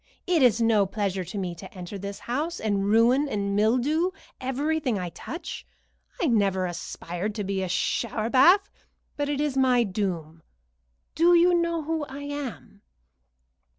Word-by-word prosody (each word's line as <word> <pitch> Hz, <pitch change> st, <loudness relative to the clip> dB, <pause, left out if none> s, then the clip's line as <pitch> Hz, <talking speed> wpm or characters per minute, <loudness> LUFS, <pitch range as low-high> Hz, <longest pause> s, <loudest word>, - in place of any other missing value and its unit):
It 355 Hz, -4 st, +2 dB
is 240 Hz, -3 st, +5 dB
no 220 Hz, -4 st, +3 dB
pleasure 195 Hz, -2 st, -2 dB
to 185 Hz, +5 st, -7 dB
me 185 Hz, -3 st, -2 dB
to 185 Hz, +3 st, -11 dB
enter 180 Hz, +1 st, -8 dB
this 200 Hz, +1 st, -6 dB
house, 300 Hz, +8 st, -3 dB
and 200 Hz, -2 st, 0 dB
ruin 235 Hz, +7 st, +4 dB
and 200 Hz, -3 st, -1 dB
mildew 255 Hz, -, +2 dB, 0.3 s
everything 270 Hz, -1 st, -1 dB
I 180 Hz, -2 st, -3 dB
touch. 325 Hz, -, -7 dB, 0.6 s
I -, -, +1 dB
never 200 Hz, -, +2 dB
aspired 175 Hz, +3 st, -5 dB
to 210 Hz, -, -2 dB
be 195 Hz, 0 st, -2 dB
a 185 Hz, -, -3 dB
shower 215 Hz, +4 st, -1 dB
bath, 355 Hz, +10 st, +5 dB, 0.4 s
but 290 Hz, 0 st, -2 dB
it 290 Hz, -1 st, -1 dB
is 295 Hz, -2 st, 0 dB
my 255 Hz, -2 st, +4 dB
doom. 180 Hz, -6 st, -3 dB, 0.7 s
Do 345 Hz, +2 st, +5 dB
you 350 Hz, +1 st, +5 dB
know 335 Hz, -2 st, +1 dB
who 320 Hz, 0 st, -2 dB
I 280 Hz, +1 st, -8 dB
am?" 285 Hz, -8 st, -6 dB
230 Hz, 155 wpm, -26 LUFS, 195-290 Hz, 0.7 s, is